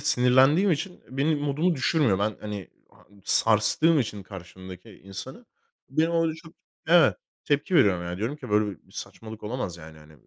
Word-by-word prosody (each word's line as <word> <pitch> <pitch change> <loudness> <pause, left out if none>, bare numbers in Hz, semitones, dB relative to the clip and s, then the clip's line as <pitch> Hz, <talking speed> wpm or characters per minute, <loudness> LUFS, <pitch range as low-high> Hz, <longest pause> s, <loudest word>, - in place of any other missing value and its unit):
sinirlendiğim 130 +10 +4
için, 170 +5 -3
eee, - - -20 0.2
benim 145 +2 +1
modumu 150 +5 0
düşürmüyor. 135 - +2
Ben, 105 +1 -1
hani, 105 -4 -6 0.2
ha - - -23 0.2
sarstığım 115 +12 +3
için 105 -5 -4
karşımdaki 95 +2 -11
insanı, 100 - -10 0.4
benim 155 +4 +1
orada 165 -1 +1
çok, 165 +1 -15 0.3
evet, 170 +1 +5 0.3
tepki 145 +5 0
veriyorum. 95 - +4
Ya, 85 0 -5
diyorum 115 +8 -3
ki: 150 - -10
"Böyle 105 0 +3 0.2
bir - - -23
saçmalık 110 -1 -9
olamaz, 105 -5 -4
yani, 80 -1 -12
hani. 75 0 -17
125 Hz, 165 wpm, -26 LUFS, 100-155 Hz, 0.4 s, evet